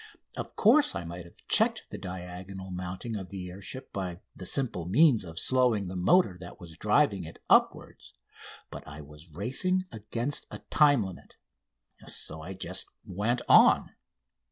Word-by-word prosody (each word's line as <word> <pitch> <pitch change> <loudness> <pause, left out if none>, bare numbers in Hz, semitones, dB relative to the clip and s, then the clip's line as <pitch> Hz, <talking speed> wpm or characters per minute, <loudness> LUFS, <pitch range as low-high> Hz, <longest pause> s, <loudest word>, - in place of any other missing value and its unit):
Of - - -6
course, 280 +7 +4
I 85 - -3
might 85 +1 -8
have 85 - -18
checked - - +2
the - - -6
diagonal 95 +1 -8
mounting 90 +5 -5
of 95 -2 -8
the 90 -2 -7
air 95 +3 -11
ship 130 +6 -7
by 90 -2 -5
the 90 - -6
simple 120 -11 +1
means 120 - +4
of 80 -2 -10
slowing 125 -5 +2
the 95 - -6
motor 95 - +3
that 90 - -10
was 85 -2 -11
driving 105 - +2
it 80 0 -10
upward; - - +2 0.7
but - - -7
I 75 +1 -9
was 75 +3 -14
racing 130 - -1
against 115 +6 -3
a - - -7
time 145 -6 +5
limit, 95 -2 -10 0.6
and - - -9
so 80 - 0
I 90 +5 -7
just 95 - -2 0.2
went 110 +7 -2
on. - - +6
95 Hz, 165 wpm, -28 LUFS, 90-120 Hz, 0.7 s, on